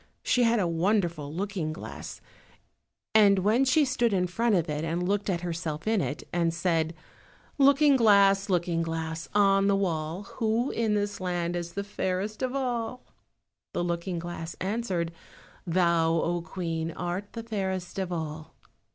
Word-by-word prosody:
She 250 - +2
had 235 -1 +4
a 185 - +1
wonderful 170 -4 0
looking 185 -2 -3
glass, 155 - -8 0.9
and 205 -2 +6
when 215 +7 +3
she 290 +3 +4
stood 245 -4 +1
in 180 -2 +2
front 225 +5 +1
of 170 -2 +1
it 150 0 -2
and 170 +2 -1
looked 205 +1 0
at 175 -3 0
herself 165 -3 -4
in 220 -2 +2
it, 150 - -4
and 170 -1 +2
said— 165 -1 0 0.6
"Looking 280 0 +6
glass, 200 -3 +5
Looking 175 -2 +1
glass, 165 0 -4
on 195 -1 +4
the 200 - +4
wall, 170 -1 -2 0.2
Who 230 +2 +1
in 220 -2 0
this 205 0 -1
land 175 -1 -1
is 170 -1 -4
the 200 - -3
fairest 200 +1 -3
of 255 0 -1
all?" 250 -2 -2 0.7
the - - 0
looking 175 +1 -2
glass 165 -1 -6
answered— 190 -4 -1 0.6
"Thou, 170 -2 +3
O 170 +1 0
Queen, 165 -1 -3
art 175 +4 -4
the 230 - -5
fairest 190 -4 -3
of 185 -1 -2
all!" 155 -2 -5
185 Hz, 160 wpm, -28 LUFS, 170-210 Hz, 0.9 s, and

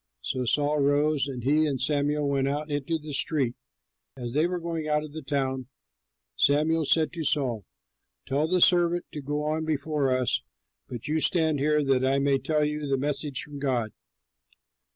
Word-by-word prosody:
So 130 -1 -2
Saul 145 +4 +1
rose, 145 0 +2
and 125 -4 -6
he 150 +4 +3
and 135 -3 -2
Samuel 145 +1 0
went 135 -1 +1
out 150 +2 -3
into 145 +3 -1
the 150 -1 -8
street. 135 -4 0 0.6
As 120 -2 -5
they 155 +4 +2
were 180 0 -3
going 165 -2 -4
out 150 0 +1
of 150 -1 -9
the 160 - -6
town, 130 -2 -2 0.7
Samuel 155 +3 +2
said 160 +2 +2
to 165 -2 -4
Saul, 125 - 0 0.6
"Tell 145 +4 0
the 180 +1 +1
servant 175 0 +4
to 150 - -6
go 145 +2 -2
on 155 +1 -1
before 150 -2 -1
us, 130 -1 +1 0.5
but 120 -3 -6
you 155 +1 +1
stand 160 -2 +2
here 150 +1 +2
that 135 -2 +2
I 135 +1 +2
may 140 0 +2
tell 150 +3 +1
you 150 0 -3
the 135 -1 +1
message 145 0 -2
from 145 -1 -9
God." 125 -6 -1
145 Hz, 180 wpm, -27 LUFS, 135-155 Hz, 0.7 s, servant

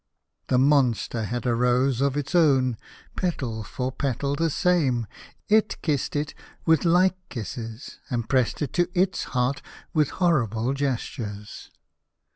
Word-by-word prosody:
The 125 - +2
monster 125 -5 +2
had 120 +3 -3
a 120 - +2
rose 125 +2 +2
of 140 0 +1
its 145 0 -3
own, 135 -8 +4 0.4
petal 130 - -2
for 125 +5 -3
petal 140 +1 -1
the 165 +2 +1
same! 140 -8 +2 0.4
It 215 0 +2
kissed 150 -4 -1
it 145 0 -1 0.3
with 160 0 +3
like 185 +2 +4
kisses, 115 0 -7
and 120 -4 -2
pressed 130 +3 +1
it 135 - -4
to 175 -1 +2
its 190 +1 +1
heart 125 +3 +1 0.3
with 150 -4 +3
horrible 130 - +1
gestures. 120 -6 -4
135 Hz, 135 wpm, -25 LUFS, 120-150 Hz, 0.4 s, own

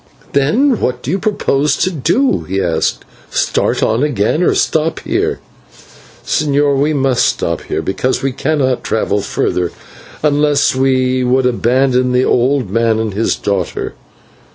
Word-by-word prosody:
"Then 220 - +2
what 125 0 -2
do 135 - -3
you 190 - 0
propose 150 -9 0
to 185 - 0
do?" 240 - +1
he 95 +1 -2
asked. 85 -4 -1 0.2
"Start - - 0
on 110 +3 +1
again, 145 - 0
or 180 - +2
stop 160 +1 0
here?" - - -1 0.9
"Señor, 145 -1 +1
we 145 +2 +2
must 135 -4 +1
stop - - -1
here - - -3
because 130 +6 -1
we 135 - 0
cannot 135 -1 -1
travel 105 -2 0
farther, 90 -2 -1 0.5
unless 145 -1 +2
you 130 -1 +1
would 130 +1 +2
abandon 125 +1 +1
the 125 +1 +2
old 125 -4 +1
man 115 0 +2
and 110 -2 -2
his 110 +3 0
daughter. 100 -4 -3
130 Hz, 145 wpm, -15 LUFS, 120-145 Hz, 0.9 s, Then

